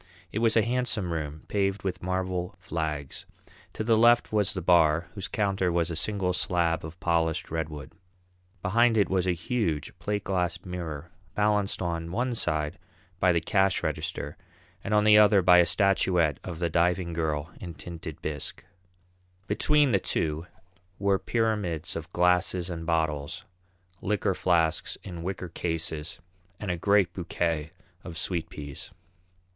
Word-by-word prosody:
It 105 - -2
was 115 0 +3
a 110 - +5
handsome 115 -6 -1
room, 75 -1 -4
paved 100 -1 0
with 90 -2 -3
marble 90 -1 -2
flags. 75 -4 -4 0.5
To - - -3
the 115 0 +4
left 120 0 +4
was 105 -2 +2
the 95 - -3
bar, 85 -2 +4
whose 100 -2 -5
counter 95 -3 0
was 85 0 0
a - - -3
single 95 +1 0
slab 85 -2 0
of 80 +3 -8
polished 85 -2 0
redwood. 75 -3 -4 0.7
Behind 115 +4 +3
it 100 -4 +3
was 95 -1 +1
a 90 - +3
huge, 85 - -2
plate 105 -1 -2
glass 90 -2 0
mirror, 85 -3 -6 0.2
balanced 105 -2 +2
on 85 -1 -3
one 120 +6 0
side 75 -6 -1 0.4
by 90 0 +4
the 85 - +3
cash 95 +1 +2
register - - -3 0.5
and 105 - 0
on 105 - +4
the 105 0 +7
other 105 -2 +6
by 90 0 +7
a 85 - +5
statuette 90 - +2
of 85 -3 -6
the 85 0 0
Diving 85 +1 +1
Girl 80 -2 -2
in 85 -3 -7
tinted 80 -1 -8
bisque. 75 -2 -5 0.8
Between 145 +7 +3
the 100 - +3
two 80 -1 -2 0.5
were 100 -1 +2
pyramids 105 -8 -1
of 80 +1 -6
glasses 90 0 +2
and 80 -1 -5
bottles, 80 +2 -1 0.6
liqueur 100 -1 0
flasks 85 -2 +1
in 85 -3 -7
wicker 90 0 -4
cases, 80 -2 -3 0.4
and 100 -3 -2
a - - 0
great 100 +2 +3
bouquet 85 -3 -2 0.3
of 85 -2 -7
sweet 85 0 -2
peas. 70 -3 -8
90 Hz, 150 wpm, -27 LUFS, 80-100 Hz, 0.8 s, the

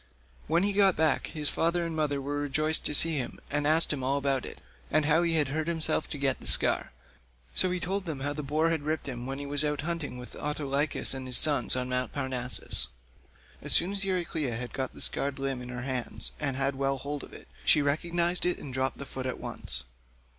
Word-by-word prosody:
When 170 +4 +2
he 200 0 +1
got 195 -2 +5
back, 155 -2 +2
his 150 -2 -3
father 170 +3 +1
and 165 -1 -4
mother 150 -3 0
were 145 +1 -3
rejoiced 155 +2 0
to 150 - +3
see 160 +1 +6
him, 130 - -4
and 145 0 0
asked 160 +1 +3
him 135 -3 -4
all 135 +2 +1
about 140 -2 0
it, - - -10 0.3
and 155 0 +2
how 160 +2 +4
he 170 -1 +1
had 150 -4 +2
hurt 155 +3 -2
himself 165 -2 -1
to 150 - -4
get 135 -2 0
the - - -9
scar; - - +2 0.6
so 185 - +3
he 180 0 -1
told 195 +3 -2
them 155 -5 -5
how 145 +1 -2
the 150 - -4
boar 155 +4 +1
had 160 -2 0
ripped 155 +1 -2
him 125 -2 -5
when 135 0 -4
he 145 - -5
was 145 +1 0
out 150 -1 -1
hunting 160 -5 -4
with 125 0 -10
Autolycus 145 -1 0
and 130 -1 -5
his 125 - +6
sons 145 -7 +5
on 125 0 -2
Mt. 125 0 -2
Parnassus. 130 - 0 0.7
As - - +4
soon 180 +3 +7
as 200 0 0
Euryclea 170 -9 -1
had 120 +1 -5
got 130 -1 -3
the - - -8
scarred 140 -1 -1
limb 135 -2 -2
in 125 - -7
her 125 0 -5
hands 125 - -2
and 135 - 0
had 135 0 +1
well 135 0 0
hold 145 +1 -5
of - - -11
it, - - -12 0.2
she 150 - +5
recognised 170 +4 +1
it 180 0 +2
and 135 - -8
dropped 130 +1 -1
the 140 - -6
foot 130 -1 -5
at 130 - -4
once. - - 0
145 Hz, 235 wpm, -29 LUFS, 135-160 Hz, 0.7 s, soon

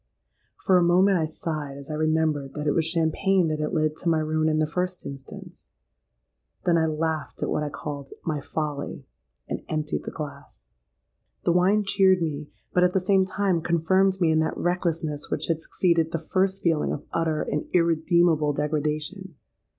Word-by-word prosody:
For 185 - +3
a - - +3
moment 185 +2 +4
I 160 - 0
sighed 155 -3 -4
as 140 +2 -8
I - - -3
remembered 155 -2 0
that 150 0 -4
it 145 - +3
was 160 - +1
champagne 165 +2 +2
that 155 0 -2
had 150 - -1
led 155 -3 +1
to 170 - -1
my 165 - +3
ruin 155 0 +1
in 155 - +1
the 155 - +2
first 180 +3 -3
instance:—then 130 - -8
I 160 -1 +3
laughed 155 -1 -2
at - - -1
what - - 0
I 150 - -2
called 140 -1 -6 0.2
'my 155 -3 -1
folly,' 145 -1 -4 0.4
and - - -4
emptied 155 -1 -2
the - - -3
glass. 145 -1 -9 0.7
The - - +2
wine 190 +4 +3
cheered 190 -2 +4
me, 150 -2 -4 0.2
but, 180 - +4
at 180 0 +3
the 190 - +3
same 190 +1 +3
time, 190 -3 0
confirmed 185 +4 +2
me 170 -3 +3
in 160 - +3
that 160 - -1
recklessness 165 -4 -1
which - - -1
had 165 -1 0
succeeded 165 -2 +1
the - - 0 0.2
first 190 0 +1
feeling 165 -3 +1
of 145 - -4
utter 160 -2 0
and 150 - -3
irredeemable 165 -2 +3
degradation. 155 +5 -2
160 Hz, 180 wpm, -25 LUFS, 150-180 Hz, 0.7 s, moment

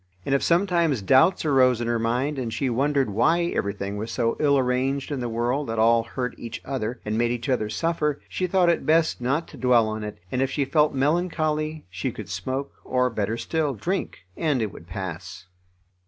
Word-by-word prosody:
And 135 - 0
if 140 - +3
sometimes 170 - +2
doubts 145 - +4
arose 130 -4 +4
in 120 - -2
her 120 0 0
mind 125 +5 0
and 120 -3 -3
she 130 +3 -1
wondered 135 -1 +1
why 165 - +2
everything 100 0 -2
was 110 +2 -4
so 115 -2 0
ill 140 -2 +4
arranged 130 +2 0
in 140 - -2
the 120 -1 -3
world 120 +5 -1
that 115 0 -3
all 115 +1 +4
hurt 125 +2 -4
each 115 -1 -6
other, 125 -3 -3
and 105 +1 -1
made 120 0 +2
each 120 +2 -3
other 120 -5 0
suffer, 150 +6 -1
she 185 - -2
thought 180 0 +3
it 170 - +2
best 160 -3 +2
not 140 +7 0
to - - -12
dwell 120 -3 +4
on 110 0 -4
it, 105 -1 -6
and 125 - 0
if 135 - +1
she 140 +1 0
felt 150 +2 +2
melancholy 155 +1 0
she 90 0 -3
could - - -9
smoke, 135 +2 -3
or, 125 -1 +1
better 110 0 -2
still, 150 0 -1
drink, 175 - -3
and 150 -5 0
it 105 - -3
would 85 - -12
pass. 95 +1 -6
130 Hz, 205 wpm, -25 LUFS, 115-150 Hz, -, doubts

